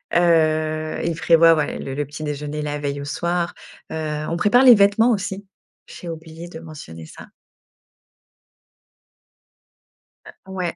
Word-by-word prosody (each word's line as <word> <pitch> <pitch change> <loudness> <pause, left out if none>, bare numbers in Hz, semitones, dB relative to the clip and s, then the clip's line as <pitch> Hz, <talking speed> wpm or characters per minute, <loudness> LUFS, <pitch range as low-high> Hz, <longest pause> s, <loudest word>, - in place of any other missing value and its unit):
Heu, 155 -2 +2
il 170 -1 -1
prévoit, 165 0 +5
ouais 150 - -2
le 135 - -6
le 145 +1 -2
petit 145 +2 -9
déjeuner, 150 0 -4
la 150 0 -3
veille 145 -1 -3
au - - -6
soir. 170 +3 -2 0.4
Heu, 155 -1 -3
on 170 - -2
prépare 210 +8 +4
les 250 -3 +9
vêtements 205 +4 +4
aussi 200 -2 -3 0.4
j'ai 175 - -11
oublié 165 0 -8
de 165 -2 -10
mentionner 145 - -10
ça. - - -13 3.0
Heu, - - -12 0.2
ouais. 180 -3 -3
160 Hz, 140 wpm, -21 LUFS, 150-175 Hz, 3.0 s, les